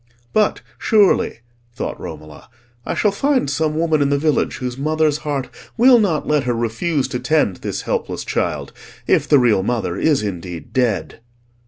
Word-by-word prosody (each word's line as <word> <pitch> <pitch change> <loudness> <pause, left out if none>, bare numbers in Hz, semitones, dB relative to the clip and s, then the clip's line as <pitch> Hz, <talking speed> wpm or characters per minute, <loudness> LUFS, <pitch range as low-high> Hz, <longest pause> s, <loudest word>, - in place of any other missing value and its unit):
"But, 215 -1 +2 0.2
surely," 205 - +3 0.3
thought - - -4
Romola, 75 0 -10 0.4
"I - - -1
shall 210 - +2
find 270 - +1
some 155 +2 -1
woman 160 -2 +1
in 140 - +2
the 140 - +2
village 150 +1 +1
whose 125 -2 -4
mother's 155 +1 +1
heart 145 -4 -3 0.3
will 245 +1 +7
not 180 -8 0
let 150 -3 +1
her 120 -1 0
refuse 125 +6 -1
to 125 - -3
tend 150 - +1
this - - -4
helpless - - -3
child—if - - -2
the 145 - +5
real 115 -7 +3
mother 105 -4 -2
is 150 -4 +2
indeed 90 -4 -6
dead." 120 -6 0
145 Hz, 160 wpm, -19 LUFS, 120-160 Hz, 0.4 s, will